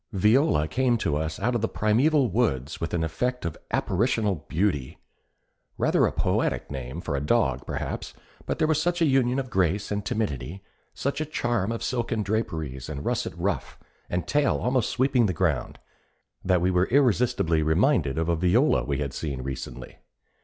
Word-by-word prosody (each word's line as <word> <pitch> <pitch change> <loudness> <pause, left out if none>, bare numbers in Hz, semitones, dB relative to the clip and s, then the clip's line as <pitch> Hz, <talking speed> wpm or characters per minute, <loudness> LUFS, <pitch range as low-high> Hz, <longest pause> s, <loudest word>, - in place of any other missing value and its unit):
Viola 105 - +3
came 125 +5 +1
to 75 -9 -1
us 80 +1 -2
out 120 +5 0
of 120 - 0
the 115 - 0
primeval 130 +7 +3
woods 80 - -1
with 80 - -2
an 80 - 0
effect 125 +9 -2
of 85 - -3
apparitional 105 - 0
beauty. 80 -7 -1 0.8
Rather - - +3
a - - -2
poetic - - -1
name 65 +2 -5
for - - -3
a 70 - -1
dog, 65 -3 +1
perhaps; - - -4 0.3
but - - -1
there 155 - +2
was 155 -1 +2
such 175 +1 0
a 165 - +4
union 130 -3 +2
of 130 -2 -3
grace 95 0 +1
and 105 0 -1
timidity, 95 - -3 0.3
such 140 +3 -2
a - - +2
charm 120 -9 -1
of 115 - -4
silken 120 -3 -1
draperies 80 - -3
and 70 -2 -5
russet - - -1
ruff - - -2 0.3
and 90 -1 -2
tail 145 +2 +2
almost 125 -2 0
sweeping 130 -2 +2
the 95 - -1
ground, - - -1 0.7
that 90 -2 +2
we 90 +1 +2
were 90 0 +3
irresistibly 120 - +2
reminded 80 - +2
of 80 0 0
a 85 - +2
Viola 95 - +3
we 70 -2 -2
had 70 -2 -3
seen 70 -5 -4
recently. 65 -1 -7
100 Hz, 175 wpm, -26 LUFS, 80-125 Hz, 0.8 s, a